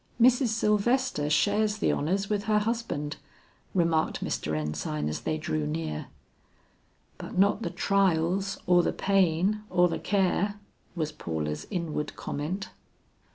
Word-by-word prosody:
"Mrs. 250 +2 +5
Sylvester 220 - +1
shares 205 +8 +2
the - - +2
honors 190 +7 0
with 205 0 -1
her 215 -1 +3
husband," 210 -9 -2 0.6
remarked 165 -3 +1
Mr. 75 0 -2
Ensign 75 0 -2
as 75 - -3
they 155 - -1
drew 80 - -2
near. 75 0 -3 1.1
"But - - -7
not 200 +3 +4
the - - -2
trials, 195 0 +1
or 175 0 +5
the - - 0
pain, 195 +1 +2
or 180 -1 +4
the 170 - -3
care?" 200 +1 +1 0.4
was 155 -3 -2
Paula's 75 - -4
inward 165 -4 -3
comment. 175 +7 -4
180 Hz, 130 wpm, -28 LUFS, 150-205 Hz, 1.1 s, Mrs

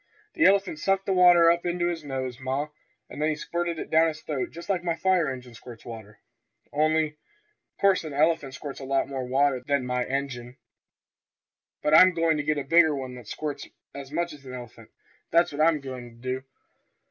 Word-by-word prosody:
"The 330 - +2
elephant 195 -5 +3
sucked 195 +2 +1
the 195 - +1
water 175 -2 +7
up 170 0 0
into 175 0 -1
his 165 -2 -4
nose, 130 -3 -4
ma, 135 +3 -2 0.4
and - - -8
then 155 - +2
he 155 - 0
squirted 170 +2 -3
it - - -7
down 160 +1 +5
his 155 -1 -4
throat 145 -4 -3
just 170 +1 -10
like 185 -3 -1
my 170 -2 0
fire 180 -2 +2
engine 125 -2 -9
squirts 115 0 -12
water. 110 -2 -10 0.6
Only, 155 0 +1 0.6
'course 195 -3 +3
an 155 - -6
elephant 145 -2 +1
squirts 140 -1 -7
lots 135 0 0
more 130 -2 -3
water 135 +1 +2
than 140 -1 0
my 125 0 -1
engine. 130 -3 -4 1.3
But 150 - +1
I'm 185 +2 +8
goin' 165 -2 +2
to 145 - -2
get 150 +1 0
a 145 - -2
bigger 160 +1 +4
one 130 -2 -5
that 125 -3 -11
squirts 150 +3 -5 0.3
as 140 -1 -9
much 170 +2 -2
as 145 -2 -14
a 130 - -9
elephant, 125 -2 -10 0.4
that's 170 +1 +3
what 145 +1 -3
I 160 0 +4
goin' 130 -3 -8
to 115 - -18
do. 130 +2 -4
150 Hz, 200 wpm, -26 LUFS, 130-170 Hz, 1.3 s, I'm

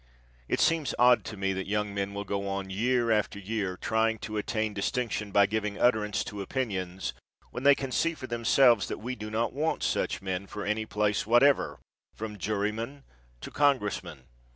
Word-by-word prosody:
It - - 0
seems 165 -3 +2
odd 125 0 +5
to 110 -2 -6
me 95 0 0
that 95 0 -4
young 105 0 -1
men 100 0 -3
will 100 - -3
go 100 0 -3
on 95 -1 -3
year 120 +3 +1
after 105 -2 +1
year 100 -2 -3
trying 110 +2 +1
to 110 0 -4
attain 110 0 -1
distinction 105 +1 -2
by 100 0 +5
giving 105 0 -2
utterance 110 -4 +2
to 105 -1 -6
opinions 95 -5 -3 0.4
when 125 - -5
they 140 +1 +6
can 135 -1 -5
see 165 +6 +1
for 130 - -7
themselves 120 -2 +4
that - - -4
we 125 +4 -5
do 105 -3 -7
not 115 +2 -1
want 155 +3 -1
such - - 0
men 95 0 -4
for 105 0 -6
any 105 +1 -1
place 105 +1 0
whatever, 130 +5 +4 0.4
from 105 -2 -6
juryman 110 +7 -2 0.4
to - - -7
congressman. 105 - 0
105 Hz, 180 wpm, -28 LUFS, 100-120 Hz, 0.4 s, they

